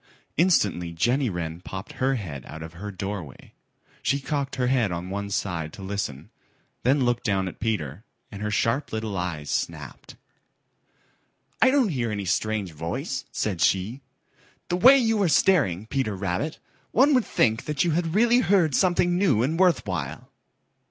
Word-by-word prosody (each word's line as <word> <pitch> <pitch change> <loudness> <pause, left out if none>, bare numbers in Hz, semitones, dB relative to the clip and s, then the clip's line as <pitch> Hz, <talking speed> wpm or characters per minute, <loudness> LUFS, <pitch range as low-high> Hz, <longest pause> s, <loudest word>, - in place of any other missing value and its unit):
Instantly 105 - +2
Jenny 120 - +1
Wren 85 -2 -4
popped 95 +2 -7
her 135 +1 0
head 80 - -6
out 80 +1 -8
of 80 +1 -9
her 100 +5 -7
doorway. 95 -6 -6 0.5
She 140 - +1
cocked 140 -1 -3
her 125 - 0
head 125 -6 +2
on 90 +2 -4
one 100 +1 -3
side 85 -6 -2
to 95 - -9
listen, 95 -8 -4 0.5
then 130 +1 +3
looked 120 -1 0
down 95 -2 0
at 95 - -8
Peter, 95 - -2 0.3
and 100 - -8
her 105 - -1
sharp 115 +6 0
little 110 -2 -3
eyes 85 -5 -3
snapped. - - -4 1.5
"I 260 - +7
don't 260 -5 +3
hear 125 -8 -1
any 100 -2 -3
strange 100 0 -1
voice," 130 - -4
said 100 -7 -2
she. 95 +9 +1 0.7
"The 175 - +1
way 260 +8 +8
you 225 -4 +2
are 185 - +3
staring, 140 - +3
Peter 115 -4 -1
Rabbit, 100 - -2 0.3
one 275 +5 +4
would 250 -4 +3
think 110 -1 +1
that 150 -2 0
you 175 - +1
had 165 +1 -1
really 240 +3 +5
heard 185 - +3
something 175 +3 +2
new 135 - +3
and 160 +6 -1
worth 185 -2 +3
while." - - -5
110 Hz, 165 wpm, -25 LUFS, 95-155 Hz, 1.5 s, way